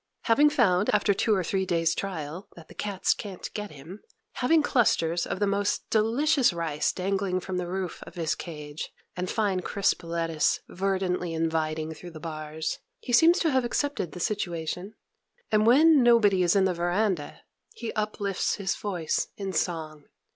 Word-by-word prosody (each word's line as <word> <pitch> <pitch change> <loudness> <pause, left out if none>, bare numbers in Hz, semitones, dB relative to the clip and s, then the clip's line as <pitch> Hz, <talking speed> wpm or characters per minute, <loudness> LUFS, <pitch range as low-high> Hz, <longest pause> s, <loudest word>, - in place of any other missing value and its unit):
Having 285 +6 +5
found, 210 - +2
after 205 0 +3
two 215 +2 +2
or 190 - 0
three 190 +3 0
days' 165 -2 +1
trial, 170 -1 -5
that 165 -2 -13
the - - -12
cats 200 -2 0
can't 195 -4 -7
get 210 -1 -4
him; 155 +7 -11 0.4
having 310 +5 +3
clusters 170 - +2
of - - -3
the 205 - +2
most 200 0 0
delicious 245 +5 +3
rice 160 -3 -1
dangling 190 0 -1
from 185 0 -4
the 180 -1 -2
roof 185 0 -4
of - - -12
his 165 -3 0
cage, 150 -3 -7 0.3
and 180 0 -3
fine 205 -4 0
crisp 195 +1 0
lettuce 165 -2 0
verdantly 185 -2 -1
inviting 160 -1 -1
through 175 +2 -10
the 160 -2 -10
bars, 155 0 -4 0.2
he 245 - -5
seems 325 +8 +6
to 325 - +1
have 260 -1 +2
accepted 240 - -2
the 180 - -7
situation; 180 0 -3 0.6
and, 215 0 +3
when 295 +4 +6
nobody 225 -6 +5
is 175 0 +3
in 195 -1 +4
the 185 - +1
veranda, 175 -1 -1 0.3
he 235 - -5
uplifts 210 -2 -1
his 195 -2 -2
voice 180 -6 -2
in 195 -2 -4
song. 155 -3 -2
185 Hz, 170 wpm, -27 LUFS, 165-210 Hz, 0.6 s, seems